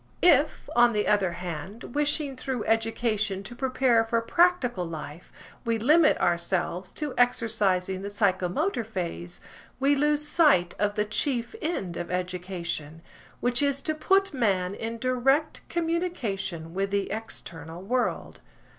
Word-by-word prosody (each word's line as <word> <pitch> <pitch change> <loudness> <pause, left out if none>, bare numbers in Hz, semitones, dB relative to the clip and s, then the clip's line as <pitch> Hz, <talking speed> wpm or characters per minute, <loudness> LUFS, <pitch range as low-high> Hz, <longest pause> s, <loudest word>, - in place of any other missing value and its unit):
If, 300 -4 +4
on 240 0 +5
the 210 -1 0
other 200 -4 +2
hand, 180 +7 -7
wishing 295 -1 +1
through 255 -3 -3
education 220 -3 0
to 240 - -8
prepare 255 -2 +2
for 230 +1 0
practical 250 - +2
life, 160 -1 -8 0.3
we 230 -2 0
limit 305 +8 +4
ourselves 175 +1 -1
to 295 -3 -4
exercising 205 -6 +1
the 200 - -5
psychomotor 200 - 0
phase, 170 - -5 0.4
we 275 +2 +3
lose 295 +1 +1
sight 280 - +4
of 205 0 +1
the 210 -1 +1
chief 240 +2 -1
end 195 - -3
of 175 0 -5
education, 180 -3 -4 0.4
which 245 +1 +2
is 280 -1 +1
to 310 - 0
put 390 +4 +2
man 195 -7 +1
in 225 +2 -5
direct 255 +5 +1
communication 270 - -2
with 195 +1 -1
the 200 0 -1
external 170 -6 -6
world. 245 +5 -2
225 Hz, 135 wpm, -27 LUFS, 185-270 Hz, 0.4 s, on